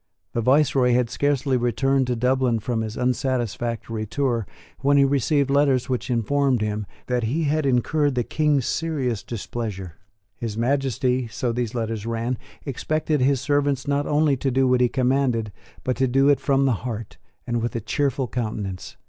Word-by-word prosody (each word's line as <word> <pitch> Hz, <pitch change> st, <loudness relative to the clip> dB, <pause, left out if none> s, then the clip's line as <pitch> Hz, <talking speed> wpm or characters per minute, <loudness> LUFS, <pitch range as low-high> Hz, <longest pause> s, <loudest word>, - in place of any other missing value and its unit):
The 115 Hz, -, 0 dB
viceroy 130 Hz, 0 st, +3 dB
had 120 Hz, -1 st, +1 dB
scarcely 140 Hz, -1 st, +1 dB
returned 125 Hz, +3 st, +1 dB
to 125 Hz, -, 0 dB
Dublin, 125 Hz, 0 st, +2 dB
from 110 Hz, +1 st, -2 dB
his 110 Hz, 0 st, -5 dB
unsatisfactory 120 Hz, -3 st, -2 dB
tour, 120 Hz, -4 st, -1 dB, 0.3 s
when 140 Hz, +1 st, +3 dB
he 140 Hz, -, +6 dB
received 140 Hz, +1 st, +1 dB
letters 140 Hz, -2 st, +2 dB
which 125 Hz, 0 st, -2 dB
informed 125 Hz, +1 st, +1 dB
him 105 Hz, -1 st, -2 dB, 0.2 s
that 125 Hz, -2 st, 0 dB
he 150 Hz, +9 st, 0 dB
had 150 Hz, 0 st, +1 dB
incurred 140 Hz, +3 st, +1 dB
the 120 Hz, -, +1 dB
King's 150 Hz, -1 st, +1 dB
serious 140 Hz, -9 st, -1 dB
displeasure. 105 Hz, -6 st, -6 dB, 0.4 s
His 110 Hz, -2 st, -4 dB
Majesty 130 Hz, 0 st, 0 dB
so 120 Hz, +2 st, -2 dB
these 120 Hz, 0 st, -2 dB
letters 115 Hz, -2 st, -3 dB
ran 115 Hz, +1 st, -2 dB, 0.3 s
expected 155 Hz, +2 st, -1 dB
his 135 Hz, 0 st, +2 dB
servants 145 Hz, -1 st, 0 dB
not 145 Hz, 0 st, 0 dB
only 150 Hz, -1 st, +3 dB
to 135 Hz, -, -1 dB
do 130 Hz, +1 st, +2 dB
what 125 Hz, 0 st, +3 dB
he 125 Hz, -, +4 dB
commanded, 125 Hz, -4 st, +1 dB, 0.3 s
but 130 Hz, -, -1 dB
to 130 Hz, -, +2 dB
do 135 Hz, +3 st, +3 dB
it 145 Hz, -, +4 dB
from 135 Hz, -1 st, +2 dB
the 135 Hz, -, +3 dB
heart, 110 Hz, -8 st, -6 dB, 0.3 s
and 120 Hz, -1 st, -1 dB
with 120 Hz, +1 st, -3 dB
a -, -, 0 dB
cheerful 135 Hz, +3 st, -1 dB
countenance. 105 Hz, -6 st, -4 dB
125 Hz, 170 wpm, -23 LUFS, 115-140 Hz, 0.4 s, he